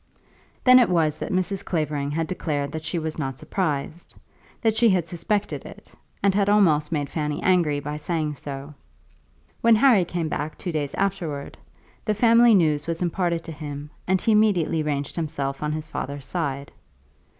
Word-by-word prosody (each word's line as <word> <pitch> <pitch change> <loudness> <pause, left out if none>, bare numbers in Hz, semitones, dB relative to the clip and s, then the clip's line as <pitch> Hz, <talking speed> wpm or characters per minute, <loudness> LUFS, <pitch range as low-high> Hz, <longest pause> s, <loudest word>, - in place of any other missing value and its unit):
Then 255 0 +8
it 240 - +4
was 160 -4 +1
that - - -4
Mrs. 185 +1 -1
Clavering 150 -4 -2
had 160 +3 -1
declared 145 -5 -3
that 160 0 -5
she 160 +2 -2
was 160 -1 -3
not 135 -3 -3
surprised, 155 0 -3 0.4
that 225 -2 +1
she 235 0 +5
had 185 -4 +2
suspected 200 +5 -1
it, - - -13 0.3
and 200 -1 +4
had 200 0 +2
almost 160 -8 +3
made 145 -3 -1
Fanny 150 -1 -3
angry 170 -6 +3
by 150 +1 -5
saying 155 -1 -2
so. 140 +1 -7 0.9
When 230 -1 +6
Harry 225 -4 +5
came 170 -1 -3
back 150 0 -4
two 180 - -4
days 150 -3 -3
afterwards, 175 -8 -3 0.4
the 215 - 0
family 230 +1 +6
news 155 -5 +2
was 165 +1 -1
imparted 170 -1 -1
to 165 - -7
him, 145 -1 -7 0.2
and 190 +1 +2
he 225 - +1
immediately 195 -7 +3
ranged 145 -2 -2
himself 140 -4 -3
on 150 0 -1
his 155 0 -4
father's 140 -2 -5
side. 140 -5 -3
160 Hz, 175 wpm, -24 LUFS, 150-190 Hz, 0.9 s, Then